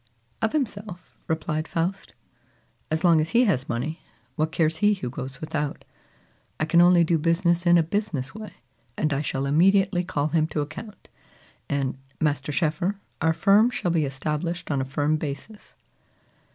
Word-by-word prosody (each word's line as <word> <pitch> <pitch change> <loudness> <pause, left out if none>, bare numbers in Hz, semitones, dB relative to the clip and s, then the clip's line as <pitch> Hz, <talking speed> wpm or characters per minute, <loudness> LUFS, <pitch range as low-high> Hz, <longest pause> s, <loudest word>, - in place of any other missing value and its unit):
"Of 220 - +1
himself," 210 - -4
replied 155 0 -2
Faust. 180 +4 -3 0.7
"As 160 0 -1
long 170 -3 +5
as 155 - -2
he 245 - +6
has 150 - 0
money, 125 +8 -3 0.3
what 155 +1 0
cares 160 +1 +1
he 210 +2 +3
who 125 -11 -5
goes 130 +1 -6
without? 150 -2 -3 0.7
I 155 - +1
can 170 +2 +4
only 175 -1 +6
do 165 0 +2
business 170 +2 +1
in 175 0 +7
a 165 - +4
business 160 -7 -2
way; 220 -1 -9 0.4
and 155 -1 +1
I 140 - 0
shall 135 -2 -2
immediately 185 +5 +3
call 150 -4 -1
him 155 0 +2
to 155 - -2
account; 200 +8 -8 0.6
and, 135 -2 -1 0.2
Master 150 -2 0
Schoeffer, 165 +6 0 0.3
our 160 0 +3
firm 205 +7 +4
shall 180 -8 -2
be 160 -3 +2
established 150 +5 -3
on 140 -2 +1
a - - -2
firm 145 +3 0
basis." 155 +9 -7
160 Hz, 165 wpm, -25 LUFS, 150-180 Hz, 0.7 s, in